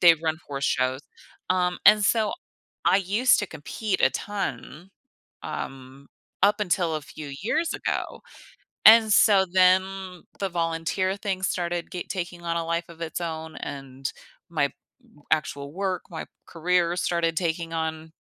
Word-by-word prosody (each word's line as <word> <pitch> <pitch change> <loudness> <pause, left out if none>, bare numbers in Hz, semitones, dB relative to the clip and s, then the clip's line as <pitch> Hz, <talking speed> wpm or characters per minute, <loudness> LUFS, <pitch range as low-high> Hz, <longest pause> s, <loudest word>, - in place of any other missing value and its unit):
they 170 -2 +8
run 160 -1 0
horse 140 -1 -3
shows, 130 0 +1 0.5
um, 180 -1 +1
and 210 0 +8
so 220 -1 +2 0.5
I - - +5
used 210 +7 +3
to 205 - -2
compete 185 +6 -3
a - - +5
ton, 180 - -5 0.5
um, 135 +1 -7 0.3
up 205 +1 +4
until 175 -4 +1
a - - -4
few 145 -1 -9
years 320 +9 0
ago, - - -3 0.6
and 220 -1 +8
so 195 -3 +6
then 185 0 +2 0.2
the 195 - 0
volunteer 170 +3 -1
thing 195 -2 -3
started 175 -2 -2
get 180 - -6
taking 175 -2 -4
on 170 0 -2
a 165 - -1
life 170 +1 -1
of 170 -1 -14
its 165 +2 -4
own, 160 -1 -5
and 135 -1 -6 0.4
my 145 -4 +1 0.6
actual 145 -2 -1
work, 190 +1 -2
my 160 - -6 0.2
career 175 +1 +1
started 170 -2 0
taking 165 -1 -1
on 160 0 -3
175 Hz, 145 wpm, -25 LUFS, 160-190 Hz, 0.6 s, they